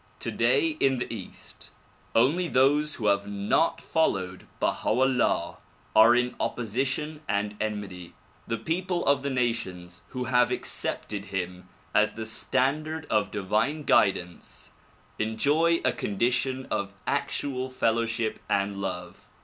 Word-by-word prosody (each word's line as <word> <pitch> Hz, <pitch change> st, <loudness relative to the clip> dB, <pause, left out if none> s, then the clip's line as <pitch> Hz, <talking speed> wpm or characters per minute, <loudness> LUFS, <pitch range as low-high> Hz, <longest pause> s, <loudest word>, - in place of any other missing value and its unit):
Today 325 Hz, -6 st, +1 dB
in 135 Hz, -1 st, +3 dB
the 125 Hz, -, -3 dB
east, 100 Hz, -5 st, -8 dB, 0.5 s
only 150 Hz, +10 st, +3 dB
those 145 Hz, +2 st, +3 dB
who 110 Hz, -, -5 dB
have 100 Hz, -1 st, +2 dB
not 100 Hz, +11 st, +1 dB
followed 95 Hz, -, -1 dB
Baha -, -, 0 dB
'Ullah 125 Hz, -9 st, +2 dB, 0.4 s
are 115 Hz, +2 st, +8 dB
in 125 Hz, 0 st, +1 dB
opposition 130 Hz, +6 st, -2 dB
and 105 Hz, 0 st, 0 dB
enmity. 100 Hz, -5 st, -4 dB, 0.3 s
The 115 Hz, -, -1 dB
people 175 Hz, +8 st, -1 dB
of 140 Hz, +1 st, +3 dB
the 140 Hz, -, -2 dB
nations 115 Hz, -9 st, -2 dB
who 125 Hz, -1 st, -4 dB
have 125 Hz, -1 st, +3 dB
accepted 105 Hz, -1 st, -2 dB
him 90 Hz, -2 st, -5 dB, 0.2 s
as 105 Hz, 0 st, +3 dB
the 110 Hz, 0 st, -5 dB
standard 150 Hz, +8 st, 0 dB
of 105 Hz, -2 st, +2 dB
divine 110 Hz, +10 st, 0 dB
guidance 90 Hz, -8 st, +1 dB, 0.5 s
enjoy 145 Hz, +10 st, +2 dB
a -, -, +4 dB
condition 125 Hz, +5 st, 0 dB
of 100 Hz, 0 st, -2 dB
actual 130 Hz, -2 st, -1 dB
fellowship 115 Hz, -2 st, 0 dB
and 100 Hz, 0 st, +1 dB
love. 90 Hz, -3 st, -5 dB
115 Hz, 125 wpm, -27 LUFS, 100-135 Hz, 0.5 s, are